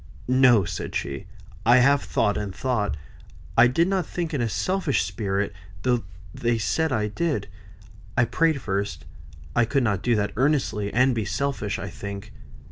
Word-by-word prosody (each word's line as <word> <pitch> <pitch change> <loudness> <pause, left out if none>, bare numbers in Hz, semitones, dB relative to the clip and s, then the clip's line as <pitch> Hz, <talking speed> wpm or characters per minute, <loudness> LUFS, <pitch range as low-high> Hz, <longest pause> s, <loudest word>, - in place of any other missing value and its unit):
"No!" 125 -5 +5
said 85 - -5
she. 70 -1 -3 0.4
"I 120 +4 +6
have 140 +3 +5
thought 105 - +1
and 100 -3 -4
thought. 120 -6 -1 0.6
I 115 +1 +7
did 165 +8 +2
not 190 -1 +1
think 170 -2 -4
in 140 - 0
a 115 - 0
selfish 185 - 0
spirit, 100 -2 -2 0.3
though 120 -4 +1 0.3
they 120 0 0
say 160 +8 0
I 115 -9 0
did. 145 - -1 0.7
I 120 - +5
prayed 155 +5 +1
first. 95 -7 -3 0.5
I 120 - +5
could 135 +3 +1
not 100 -5 0
do 120 -1 +2
that 105 -1 -1
earnestly, 120 -7 +1
and 125 +2 +3
be 110 -3 -1
selfish, 110 -3 -2
I 95 -1 -6
think. 100 +1 -7
120 Hz, 165 wpm, -25 LUFS, 100-140 Hz, 0.7 s, I